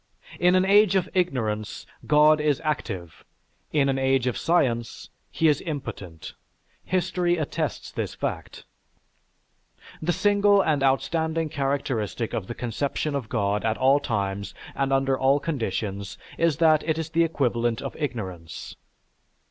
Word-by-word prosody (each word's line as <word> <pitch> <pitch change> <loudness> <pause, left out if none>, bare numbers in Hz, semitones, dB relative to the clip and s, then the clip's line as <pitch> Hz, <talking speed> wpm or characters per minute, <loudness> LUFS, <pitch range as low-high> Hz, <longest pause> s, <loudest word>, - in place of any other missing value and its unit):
In 180 +1 +4
an 185 0 +4
age 200 0 +5
of 185 -2 +2
ignorance, 115 - -1 0.2
God 150 0 +5
is 150 -2 +1
active; 95 - -4 0.5
in 145 -3 +2
an 135 -1 0
age 135 -1 +2
of 125 - 0
science, 120 -9 0 0.2
he 160 - +1
is 150 -2 +3
impotent. 115 - -6 0.5
History 180 -1 0
attests 155 -3 -3
this - - -4
fact. - - -5 1.4
"The 165 +3 +1
single 205 +1 +3
and 155 -6 +2
outstanding 160 +4 +1
characteristic 130 - -2
of 95 - -3
the 120 - -5
conception 140 +5 -2
of 135 -6 -3
God 105 -3 0
at 110 0 0
all 135 +2 +4
times, 100 -7 -3 0.2
and 135 0 -1
under 135 0 +2
all 135 +2 +3
conditions 105 - -3 0.2
is 165 -4 +1
that 155 -2 +4
it 160 -1 -1
is 160 -1 -4
the 170 +1 +3
equivalent 120 -7 0
of - - -6
ignorance. 95 - -5
140 Hz, 140 wpm, -25 LUFS, 115-160 Hz, 1.4 s, age